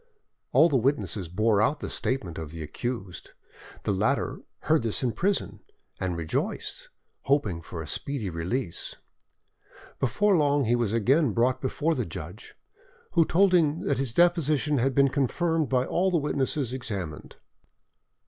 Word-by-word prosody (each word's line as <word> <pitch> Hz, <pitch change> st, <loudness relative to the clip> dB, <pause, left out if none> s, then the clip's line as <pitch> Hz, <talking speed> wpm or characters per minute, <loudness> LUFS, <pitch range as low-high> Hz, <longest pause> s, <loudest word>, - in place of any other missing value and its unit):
All 165 Hz, -, +6 dB
the 145 Hz, -5 st, +2 dB
witnesses 115 Hz, -, 0 dB
bore 105 Hz, +3 st, +2 dB
out 140 Hz, +8 st, +1 dB
the -, -, -5 dB
statement 95 Hz, -12 st, -3 dB
of 80 Hz, -2 st, -6 dB
the 80 Hz, +1 st, -7 dB
accused; 95 Hz, +3 st, -5 dB, 0.5 s
the -, -, 0 dB
latter 100 Hz, +3 st, 0 dB, 0.2 s
heard 160 Hz, -2 st, +2 dB
this 115 Hz, +2 st, 0 dB
in 125 Hz, -, +1 dB
prison, 115 Hz, -, -1 dB, 0.4 s
and 90 Hz, -2 st, -2 dB
rejoiced, 80 Hz, -1 st, -3 dB, 0.4 s
hoping 110 Hz, -, +1 dB
for 80 Hz, 0 st, -7 dB
a -, -, -10 dB
speedy 135 Hz, -, -3 dB
release. 85 Hz, +5 st, -3 dB, 1.0 s
Before 195 Hz, -, +2 dB
long 145 Hz, -3 st, +3 dB
he 120 Hz, 0 st, +2 dB
was 120 Hz, -4 st, 0 dB
again 125 Hz, +4 st, +2 dB
brought 125 Hz, +3 st, +1 dB
before 150 Hz, +5 st, 0 dB
the 125 Hz, -, -1 dB
judge, 85 Hz, +1 st, -9 dB, 0.6 s
who 165 Hz, -, +5 dB
told 190 Hz, +3 st, +3 dB
him 160 Hz, -3 st, +3 dB
that 140 Hz, -, 0 dB
his 135 Hz, -4 st, -1 dB
deposition 155 Hz, -2 st, +3 dB
had 130 Hz, +1 st, +1 dB
been 140 Hz, -1 st, +5 dB
confirmed 155 Hz, +3 st, 0 dB
by 130 Hz, -1 st, +2 dB
all 185 Hz, +6 st, +1 dB
the 180 Hz, -, +2 dB
witnesses 140 Hz, -3 st, -1 dB
examined. 100 Hz, -, -5 dB
130 Hz, 150 wpm, -27 LUFS, 100-150 Hz, 1.0 s, All